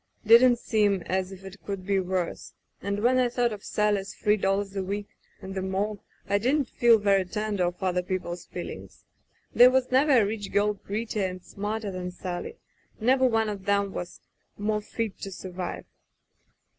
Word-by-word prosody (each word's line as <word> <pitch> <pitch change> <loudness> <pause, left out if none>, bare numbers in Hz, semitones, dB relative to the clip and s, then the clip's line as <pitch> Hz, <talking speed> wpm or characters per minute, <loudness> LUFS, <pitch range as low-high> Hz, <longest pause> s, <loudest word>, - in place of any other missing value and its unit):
Didn't 240 +3 +7
seem 210 -5 +1
as 185 0 -1
if 195 0 -11
it 195 +1 -11
could 195 -2 -5
be 200 0 +2
worse 185 -2 -3
— - - -45
and 200 +1 -2
when 255 +2 +4
I 250 -1 +3
thought 240 -1 0
of 205 - -9
Sally's 205 -2 0
three 210 0 +2
dollars 195 0 -1
a 195 - -1
week, 200 +2 -4 0.3
and 190 0 -6
the 190 - -2
morgue, 195 +2 -2 0.3
I 200 0 +2
didn't 260 +4 +1
feel 235 -1 +5
very 200 -2 +3
tender 205 0 -1
of 175 +2 -4
other 180 -1 +1
people's 180 -1 -4
feelings. 175 - -8 0.5
There 245 +1 +8
was 255 0 +1
never 275 +3 +4
a 230 -5 +5
rich 205 -1 -4
girl 205 +1 +2
prettier 210 0 -3
and 185 -1 -7
smarter 210 +1 -4
than 180 -1 -4
Sally, 180 - -5 0.4
never 260 +3 +4
one 225 -2 +1
of 205 -2 -3
'em 190 - -18
that 200 -1 +1
was 175 -2 -7 0.4
more 210 +1 0
fit 220 0 -4
to 195 - -6
survive. 185 0 -6
200 Hz, 185 wpm, -27 LUFS, 190-220 Hz, 0.5 s, There